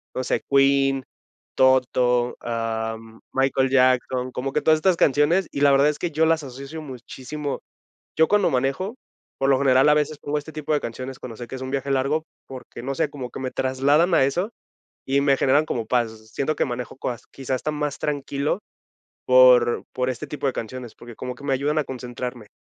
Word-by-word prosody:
No 130 - -1
sé, - - 0
Queen, 135 -1 +3 0.5
Toto, 125 -2 +3
am, 115 -1 -4
Michael 135 0 +2
Jackson, 130 -1 +2
como 135 +2 -4
que - - +1
todas 155 0 +4
estas 185 +3 +3
canciones, 150 +7 +3
y 140 - -4
la 145 -1 +6
verdad 140 +2 +5
es 150 - -3
que 175 - -2
yo 155 +2 +2
las 160 -1 +2
asocio 140 +4 -8
muchísimo. 135 +1 -6 0.6
Yo 160 - +6
cuando 205 -4 +3
manejo, 140 - -1 0.4
por 135 - +1
lo 135 - +4
general, 135 +1 +4
a 150 - +6
veces 150 0 0
pongo 145 +1 -2
este 150 +2 -9
tipo 155 0 -3
de 145 - +1
canciones 130 +3 -6
cuando 115 -3 -8
sé 120 - -7
que - - -9
es 130 - -8
un 130 - -5
viaje 140 0 -2
largo 140 +4 0 0.2
porque, 130 -2 -10
no 135 +2 -3
sé, 150 +1 0
como 130 -4 -7
que - - -8
me 130 -1 -3
trasladan 140 +7 +2
a 135 - +5
eso 175 +10 -1 0.5
y 135 +1 +2
me 140 -1 +4
generan 140 +3 +3
como 115 -6 -3
paz. 110 -2 -1
Siento 155 +6 -1
que - - +2
manejo 125 -2 -5
coas 125 -2 -5
quizás 130 -1 -3
hasta 155 - -3
más 150 -1 -3
tranquilo 145 +3 -2 0.7
por 125 -2 +6
por 125 0 -1
este 130 +4 -5
tipo 145 0 -4
de 135 - +1
canciones, 120 0 -6
porque 120 0 -12
como 125 0 -5
que 140 - -14
me 140 - 0
ayudan 145 +3 0
a 150 - +1
concentrarme. 125 -3 -6
135 Hz, 200 wpm, -23 LUFS, 125-145 Hz, 0.7 s, la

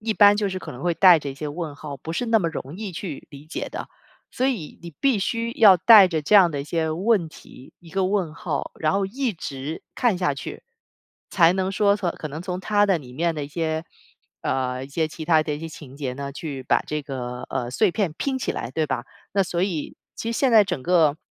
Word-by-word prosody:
一 220 0 -1
般 205 -1 +7
就 205 -2 0
是 185 0 -4
可 - - -8
能 125 - -10
会 175 -1 +1
带 180 -3 +7
着 145 - -6
一 - - -8
些 150 +1 -5
问 155 -1 -5
号， 145 -1 -8
不 160 +5 -7
是 245 - -2
那 225 -1 +4
么 170 -5 0
容 150 -1 -7
易 205 -2 -6
去 170 -4 -6
理 140 0 -12
解 160 - -5
的。 - - -6 0.4
所 260 +1 0
以 210 - -3
你 170 - -8
必 270 -6 +3
须 230 +4 -2
要 200 -4 +8
带 210 0 +9
着 160 -3 -1
这 180 +8 +1
样 185 -4 +7
的 145 -3 -3
一 - - -6
些 160 +1 -1
问 185 +1 +1
题、 130 - -15
一 170 - -16
个 190 +2 0
问 185 -5 0
号， 165 -5 -4
然 155 0 +1
后 195 -1 +1
一 250 +2 -2
直 145 -1 -6
看 230 -8 +1
下 175 -7 +1
去， - - -8 0.7
才 170 +2 +5
能 190 0 -1
说 200 +1 +3
说 185 -4 -1
可 155 - -7
能 150 +4 -7
从 180 0 -4
它 205 +2 +2
的 190 -4 +2
里 125 -4 -12
面 165 +3 0
的 150 -2 -3
一 - - -9
些， 160 +1 -2 0.6
呃， 130 0 -1
一 - - -11
些 160 +2 0
其 160 +1 -8
他 160 -1 +4
的 150 -1 -3
一 - - -6
些 165 - -5
情 140 -4 -12
节 135 -4 -3
呢， 140 +1 -5
去 140 -3 -6
把 - - +2
这 150 0 -2
个， 125 -3 -5
呃， 120 0 -3
碎 210 - +2
片 185 -4 -1
拼 270 -2 -1
起 - - -2
来， - - -5
对 155 -1 -1
吧？ 120 -2 -3 0.3
那 195 0 +3
所 175 -1 -2
以 175 -6 -3 0.2
其 230 - -4
实 230 - -2
现 265 -3 +2
在 220 -2 +8
整 135 -8 -4
个， 160 -4 +3
170 Hz, 270 characters per minute, -23 LUFS, 150-200 Hz, 0.7 s, 带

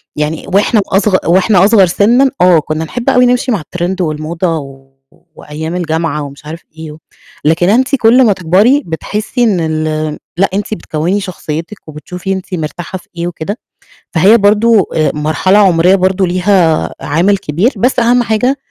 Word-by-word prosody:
يعني 150 +1 -3
وإحنا 205 +2 +2
أصغ 195 0 +2
وإحنا 185 +2 +3
أصغر 205 -3 +5
سِنًا 240 +9 +2
آه 180 -3 +5
كنا 155 +1 -4
نحب 245 +7 -3
أوي 250 0 +4
نمشي 250 +1 +1
مع 205 - -1
الtrend 180 +4 -4
والموضة 165 +2 -2 0.8
وأيام 160 +3 -7
الجامعة 160 -3 -2
ومش 140 +1 -11
عارف 165 +2 -8
إيه 160 -1 -8
و 150 - -12 0.5
لكن 175 +4 +2
أنتِ 260 +5 +2
كل 245 +1 +4
ما 210 - +3
تكبري 195 - +2
بتحسي 210 +9 -3
إن 210 -6 +1
ال 155 -1 -2 0.2
لأ 195 +2 +2
أنتِ 205 +2 -3
بتكوّني 175 +1 -2
شخصيتِك 170 0 -6
وبتشوفي 180 +5 -6
أنتِ 190 0 -7
مرتاحة 170 +3 -5
في - - -19
إيه 170 - -2
وكده. 175 +5 -5 0.6
فهي 190 +7 +5
برضو 210 +1 +3
آآ، 155 -2 -1
مرحلة 155 +6 +1
عمرية 185 -2 +4
برضو 190 0 +1
ليها 180 -3 +1
عامل 170 +8 +1
كبير. 190 - -1
بس 250 +6 0
أهم 240 +1 +3
حاجة 245 +5 0
185 Hz, 160 wpm, -12 LUFS, 160-210 Hz, 0.8 s, أصغر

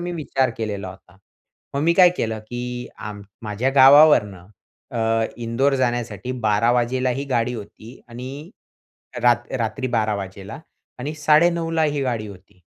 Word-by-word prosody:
मी 175 0 -4
विचार 135 -5 -1
केलेला 105 -4 -4
होता. 90 0 -15 0.6
मग 140 - 0
मी 170 +1 +3
काय 180 -1 +7
केलं 110 -1 -2
की 125 0 -5
आम 105 -1 -7 0.2
माझ्या 110 +5 -1
गावावरनं 130 - +6 0.4
अ, 115 -1 0
इंदोर 120 +4 0
जाण्यासाठी 120 -2 -2
12:00 105 +3 +3
वाजता 125 +1 0
ही 135 +3 -3
गाडी 125 0 0
होती 110 +2 -11
आणि 130 +6 -8 0.7
रात 120 0 +3
रात्री 115 +3 -2
12:00 110 -3 0
वाजता 95 -1 -7 0.4
आणि 145 +5 -4
9:30 165 +3 +2
ला 165 -1 +1
ही 145 -2 -1
गाडी 115 -4 -2
होती. 95 -2 -15
120 Hz, 145 wpm, -22 LUFS, 110-135 Hz, 0.7 s, काय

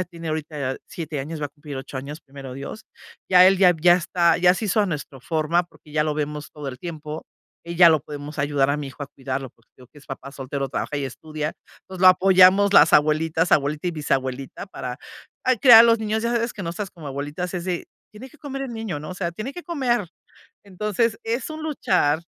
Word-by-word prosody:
ya 185 - -1
tiene 170 -2 -9
ahorita 150 -4 -3
7 160 -4 -5
años, 155 +3 -6
va 145 - -1
a - - -17
cumplir 145 0 -10
8 135 +1 -7
años, 145 +4 -7
primero 135 -2 -10
Dios. 140 +12 -8 0.5
Ya 185 0 +8
él, 195 0 +5
ya 180 -2 +6
ya 175 +1 +7
está 170 -1 +2
ya 180 0 +5
se 220 - -4
hizo 210 +3 +2
a 205 - +2
nuestro 145 -5 -6
forma, 160 +4 0
porque 155 -3 -19
ya 150 - +2
lo 155 - 0
vemos 150 0 -4
todo 150 -2 -9
el 130 - -8
tiempo. 155 -1 -7 0.4
Y 170 - -4
ya 170 0 +8
lo 160 -2 +4
podemos 145 +1 -9
ayudar 140 -1 +1
a 140 - 0
mi 150 -2 -5
hijo 135 +2 -9
a 140 - -6
cuidarlo, 130 -1 -5
porque 115 - -34
te - - -18
digo 125 - -17
que 150 - -15
es 145 - -19
papá 135 0 -8
soltero, 135 0 -4
trabaja 145 - -3
y 140 - -2
estudia. 155 +3 -5 0.3
Entonces 190 -1 -11
lo 185 - +6
apoyamos 185 +2 +6
las - - +7
abuelitas, 155 +3 +3
abuelita 150 +4 +1
y - - -1
bisabuelita 135 0 -3
para, 125 -8 -7 0.5
ay, 255 -1 +3
criar 235 -1 +9
a - - +10
los 230 -1 +4
niños. 220 0 -2
Ya 235 - 0
sabes 235 0 0
que 200 - -7
nosotras 180 +4 -4
como 160 -5 -9
abuelitas, 145 +6 -5
es 175 - -3
de: 180 -2 -3 0.2
"Tiene 245 +5 -11
que 305 - -20
comer 275 -2 -6
el 255 -3 -5
niño", 220 -9 -4
¿no? 155 +4 -8
O - - -6
sea, 175 -2 -3
"tiene 215 +10 -6
que 355 - -9
comer". 250 - 0 0.6
Entonces 210 +3 -1
es 235 +7 -3
un 310 0 -7
luchar. 180 - +1
165 Hz, 235 wpm, -23 LUFS, 145-195 Hz, 0.6 s, a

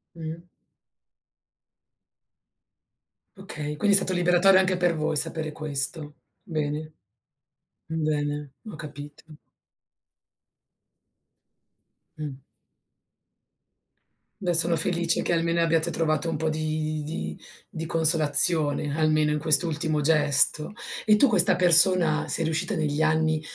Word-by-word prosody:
Mh. 165 0 -8 2.9
Okay, 155 -6 -7
quindi 200 +4 +3
è - - +10
stato 190 - -1
liberatorio 180 +2 +3
anche 185 -1 -1
per 175 -1 0
voi 155 0 -3
sapere 160 0 -1
questo, 150 0 -5 0.3
bene, 155 -1 -5 0.9
bene, 150 -3 -4
ho 210 - -9
capito. 145 -2 -11 2.9
Mh. 140 -3 -8 2.0
Beh 180 -3 -2
sono 170 +1 +4
felice 170 +1 0
che - - -2
almeno 170 0 -1
abbiate 165 0 0
trovato 160 0 -2
un 165 - -3
po' 160 +1 -3
di 155 0 -4
di 80 - -7 0.3
di 160 0 -7
consolazione, 155 -2 +3
almeno 155 -1 0
in 150 - -1
quest'ultimo 155 0 0
gesto. 150 +1 +2 0.3
E 215 - +3
tu 275 +6 +4
questa 190 -4 +4
persona 175 -2 +3
sei 165 - -1
riuscita 160 0 -2
negli 155 -1 -2
anni 160 0 0
160 Hz, 105 wpm, -24 LUFS, 150-170 Hz, 2.9 s, è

